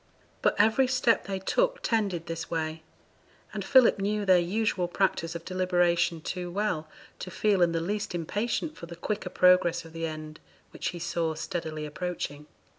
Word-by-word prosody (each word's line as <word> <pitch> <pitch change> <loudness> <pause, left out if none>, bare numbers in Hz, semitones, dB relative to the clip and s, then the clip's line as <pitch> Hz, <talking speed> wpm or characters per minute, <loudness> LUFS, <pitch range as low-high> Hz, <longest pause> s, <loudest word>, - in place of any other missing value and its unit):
But - - +3
every 220 +5 +4
step 250 -6 +2
they 195 -1 -2
took - - 0
tended 200 -7 0
this 165 -1 -5
way, 160 -1 -2 0.7
and - - -3
Philip 255 -5 +5
knew 205 +1 0
their 185 -2 +6
usual 185 0 0
practice 175 -2 0
of 170 0 -6
deliberation 175 -2 +1
too 180 +2 -4
well 175 -5 -1 0.3
to - - -6
feel 200 +1 +1
in 170 -1 +4
the 165 - 0
least 205 +2 -2
impatient 215 - -2
for 170 - -9
the 170 - -8
quicker 185 +2 -3
progress 180 -2 +4
of 165 - -13
the 165 0 -2
end 155 -1 -7 0.3
which - - -4
he 175 - -3
saw 170 -1 -1
steadily 160 -2 -4
approaching. 150 -2 -5
180 Hz, 170 wpm, -28 LUFS, 165-205 Hz, 0.7 s, their